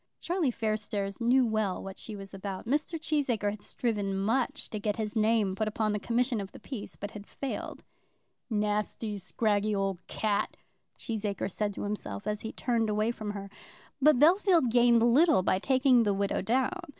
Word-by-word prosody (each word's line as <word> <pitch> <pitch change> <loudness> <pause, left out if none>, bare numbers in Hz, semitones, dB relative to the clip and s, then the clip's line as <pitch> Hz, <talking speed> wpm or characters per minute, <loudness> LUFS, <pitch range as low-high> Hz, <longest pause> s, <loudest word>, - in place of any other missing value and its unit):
Charlie 345 -4 0
Fairstairs 215 -2 -2
knew 250 +2 +4
well 215 -4 -1
what 195 0 -8
she 220 - -6
was 195 0 -10
about. 195 -1 -5
Mr. 300 +6 -1
Cheesacre 260 -10 0
had 205 0 -8
striven 205 -5 -2
much 250 +8 0
to 215 - -3
get 205 0 -1
his 215 -1 -4
name 215 -3 +2
put 215 +2 -1
upon 215 0 0
the 210 - -1
commission 240 0 0
of 195 - -7
the - - -11
peace, 255 -7 -6
but 205 +1 -6
had 205 -1 -10
failed. 275 - -5 0.7
"Nasty, 210 0 -1
scraggy 210 +1 0
old 195 -2 -1
cat," 210 -1 -1 0.4
Cheesacre 205 -3 -3
said 210 +2 -1
to - - -5
himself, 205 - -4
as 210 0 -2
he 220 - -5
turned 230 -3 0
away 215 +2 +1
from 215 -3 -6
her. 200 -1 -6 0.5
But 300 0 +6
Bellfield 335 - +5
gained 240 -1 +5
little 275 - +5
by 185 0 +2
taking 260 +1 +4
the 205 -3 +2
widow 200 0 0
down. 260 +10 0
215 Hz, 175 wpm, -29 LUFS, 205-245 Hz, 0.7 s, But